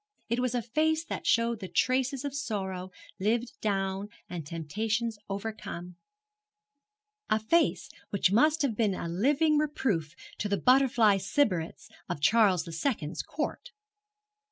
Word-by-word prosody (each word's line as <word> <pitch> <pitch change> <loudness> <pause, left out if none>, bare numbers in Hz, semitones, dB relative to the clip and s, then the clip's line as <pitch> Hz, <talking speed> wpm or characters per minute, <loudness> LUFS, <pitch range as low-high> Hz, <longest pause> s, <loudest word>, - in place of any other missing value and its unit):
It 235 +2 0
was 250 -1 0
a 240 - 0
face 315 +7 +1
that - - -5
showed 230 -1 +2
the 190 - -6
traces 260 +5 +1
of 285 - -3
sorrows 190 -9 -3 0.3
lived 230 +6 0
down 195 -1 -1 0.2
and 175 -3 -5
temptations 210 +8 -2
overcome 195 -4 -5 1.3
a 215 - +3
face 330 +11 +2 0.2
which 195 -2 +2
must 305 +8 +4
have 250 -6 0
been 205 -3 +1
a 170 - -4
living 290 - +2
reproof 220 - -1 0.2
to 210 - -1
the 200 - +1
butterfly 245 -5 +4
sybarites 190 - 0 0.2
of - - -3
Charles 200 +1 +4
the 170 - -8
Second's 165 - -2
Court. 315 +10 -4
220 Hz, 135 wpm, -29 LUFS, 190-260 Hz, 1.3 s, must